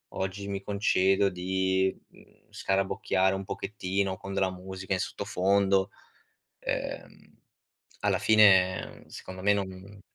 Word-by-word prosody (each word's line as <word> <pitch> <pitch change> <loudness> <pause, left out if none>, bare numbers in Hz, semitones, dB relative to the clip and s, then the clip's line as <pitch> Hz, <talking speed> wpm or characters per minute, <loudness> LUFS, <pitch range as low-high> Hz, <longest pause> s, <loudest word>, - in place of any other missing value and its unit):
Oggi 95 +1 -3
mi 100 -1 -4
concedo 100 -1 +2
di, 95 +1 0
mhmm, - - -22
scarabocchiare 95 0 0
un 95 - -4
pochettino 95 -1 -2
con 95 0 -7
della 95 -1 +1
musica 95 +1 -5
in 95 - 0
sottofondo." 95 +2 +1 0.7
Ehm, - - -5 0.6
alla - - +1
fine 95 -4 +4
secondo 95 0 -9
me 100 - +4
non 95 +1 -6
95 Hz, 110 wpm, -28 LUFS, 95-100 Hz, 0.7 s, fine